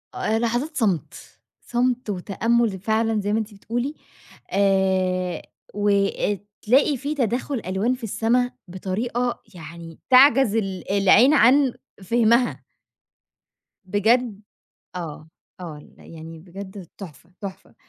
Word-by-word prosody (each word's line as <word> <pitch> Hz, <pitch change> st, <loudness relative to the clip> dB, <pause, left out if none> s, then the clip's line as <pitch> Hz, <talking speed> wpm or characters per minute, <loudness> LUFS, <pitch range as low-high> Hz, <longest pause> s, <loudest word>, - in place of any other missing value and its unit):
آآ، 220 Hz, +1 st, 0 dB
لحظات 240 Hz, +7 st, -1 dB
صمت، 200 Hz, -, 0 dB, 0.5 s
صمت 245 Hz, -1 st, -1 dB
وتأمل 210 Hz, +2 st, 0 dB
فعلًا 220 Hz, +2 st, 0 dB
زي 205 Hz, +1 st, -1 dB
ما 220 Hz, -, +2 dB
أنتِ 220 Hz, -1 st, -5 dB
بتقولي، 240 Hz, +8 st, -4 dB, 0.6 s
آآ، 190 Hz, -2 st, +1 dB, 0.3 s
وآآ 205 Hz, 0 st, +1 dB, 0.2 s
تلاقي 270 Hz, +5 st, +3 dB
في 285 Hz, +4 st, -3 dB
تداخل 250 Hz, 0 st, -1 dB
ألوان 190 Hz, +7 st, 0 dB
في 255 Hz, -1 st, -8 dB
السما 230 Hz, +3 st, +1 dB, 0.2 s
بطريقة 225 Hz, +7 st, -3 dB
يعني 165 Hz, 0 st, -10 dB
تعجز 260 Hz, -3 st, +6 dB
ال 195 Hz, -4 st, -3 dB
العين 200 Hz, +7 st, +5 dB
عن 275 Hz, -1 st, +5 dB, 0.3 s
فهمها. 235 Hz, +3 st, +2 dB, 1.2 s
بجد 220 Hz, +3 st, +1 dB, 0.6 s
آه، 160 Hz, -3 st, -7 dB, 0.3 s
آه، 165 Hz, -4 st, -7 dB
ال 150 Hz, -, -17 dB
يعني 165 Hz, 0 st, -11 dB
بجد 190 Hz, +1 st, -10 dB
تحفة، 170 Hz, -3 st, -11 dB
تحفة. 195 Hz, -2 st, -9 dB
210 Hz, 110 wpm, -23 LUFS, 190-240 Hz, 1.2 s, تعجز